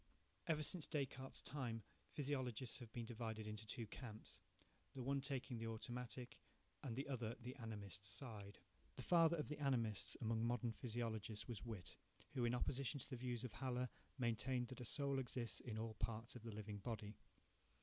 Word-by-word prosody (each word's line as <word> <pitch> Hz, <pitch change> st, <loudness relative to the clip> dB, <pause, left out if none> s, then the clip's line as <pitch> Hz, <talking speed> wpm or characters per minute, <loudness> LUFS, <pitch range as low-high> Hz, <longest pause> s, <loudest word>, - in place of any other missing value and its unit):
Ever 155 Hz, -2 st, +4 dB
since 165 Hz, +1 st, +2 dB
Descartes' 135 Hz, -3 st, -1 dB
time, 120 Hz, -6 st, -1 dB, 0.3 s
Physiologists 130 Hz, -4 st, +1 dB
have 120 Hz, -3 st, -7 dB
been 120 Hz, 0 st, -2 dB
divided 110 Hz, -2 st, -2 dB
into 105 Hz, 0 st, -3 dB
two 115 Hz, +2 st, -1 dB
camps, 110 Hz, 0 st, -6 dB, 0.5 s
the 130 Hz, -, -1 dB
one 140 Hz, +2 st, +3 dB
taking 130 Hz, -3 st, 0 dB
the 115 Hz, -, -1 dB
automatic, 120 Hz, +2 st, -3 dB, 0.4 s
and 130 Hz, -6 st, -1 dB
the 135 Hz, +3 st, 0 dB
other 120 Hz, -4 st, 0 dB
the 125 Hz, +2 st, -4 dB
animist 105 Hz, -3 st, -4 dB
side. 100 Hz, -1 st, -3 dB, 0.4 s
The -, -, -4 dB
father 170 Hz, -1 st, +7 dB
of 150 Hz, -, 0 dB
the 150 Hz, -, -2 dB
animists 120 Hz, -8 st, +3 dB
among 115 Hz, -1 st, +3 dB
modern 120 Hz, 0 st, +3 dB
physiologists 110 Hz, -2 st, -1 dB
was 120 Hz, -5 st, -2 dB
Whytt, 105 Hz, -7 st, -4 dB, 0.4 s
who, 125 Hz, -2 st, +3 dB
in 120 Hz, +1 st, +4 dB
opposition 140 Hz, +3 st, +2 dB
to -, -, -6 dB
the -, -, +1 dB
views 125 Hz, -1 st, 0 dB
of 125 Hz, -4 st, -2 dB
Haller, 125 Hz, -1 st, +1 dB, 0.3 s
maintained 125 Hz, 0 st, +3 dB
that 130 Hz, -, -5 dB
a -, -, -2 dB
soul 140 Hz, +2 st, +3 dB
exists 125 Hz, -2 st, +1 dB
in 110 Hz, -3 st, -3 dB
all 110 Hz, 0 st, 0 dB
parts 115 Hz, +1 st, 0 dB
of 125 Hz, -, -5 dB
the 115 Hz, 0 st, -4 dB
living 105 Hz, -1 st, -3 dB
body. 105 Hz, -1 st, -2 dB
120 Hz, 175 wpm, -46 LUFS, 110-130 Hz, 0.5 s, father